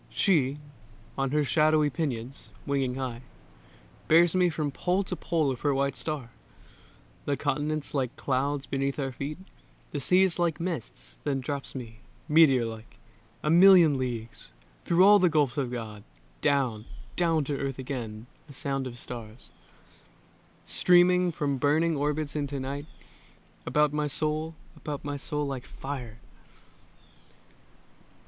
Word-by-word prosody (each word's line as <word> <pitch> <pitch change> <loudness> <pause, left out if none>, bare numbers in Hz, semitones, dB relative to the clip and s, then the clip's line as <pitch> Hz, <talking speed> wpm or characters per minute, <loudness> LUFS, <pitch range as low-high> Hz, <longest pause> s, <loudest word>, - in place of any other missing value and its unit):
She, 145 -8 +2 0.6
on 135 -1 -1
her 150 +2 +1
shadowy 155 0 +3
pinions, 130 -4 -4 0.2
winging 135 -3 0
high, 125 -3 -4 0.9
Bears 165 +1 +5
me 180 -1 +4
from 150 -3 -2
pole 180 +7 0
to 180 - -4
pole 160 -5 0
of 125 - -5
her 145 -2 +1
white 140 0 0
star, 145 -7 -4 0.9
The 140 -1 0
continents 150 +1 -2
like 130 -4 -1
clouds 140 +1 -1
beneath 135 0 -2
our 135 -2 -2
feet, 140 +4 -5 0.5
The 145 - -3
seas 180 +5 +3
like 170 -3 +1
mists; 170 -1 -6
then 140 -2 -1
drops 140 +2 -5
me, 115 -4 -8 0.3
meteor 150 -6 +5
like, 110 0 -9 0.5
A 150 - +1
million 170 -5 +7
leagues, 120 -3 -5 0.3
through 175 +2 +5
all 205 +1 +8
the 180 -2 +4
gulfs 145 -4 +1
of 130 -3 -2
God, 110 -4 -6 0.4
Down, 125 -6 +1 0.3
down 165 -3 +2
to 140 0 -2
Earth 135 -2 -3
again; 120 -5 -5 0.2
a - - -11
sound 135 -1 -2
of 120 -1 -8
stars, 115 -1 -8 1.1
Streaming 180 0 +4
from 145 -3 -1
burning 155 +4 +2
orbits 150 +1 -1
into 145 -2 -2
night, 140 +3 -5 0.8
About 150 -1 +2
my 150 0 0
soul, 155 +2 -1 0.2
about 145 -1 -6
my 145 0 -3
soul 150 +1 -3
like 135 -3 -5
fire. 125 -5 -7
145 Hz, 140 wpm, -28 LUFS, 130-155 Hz, 1.1 s, all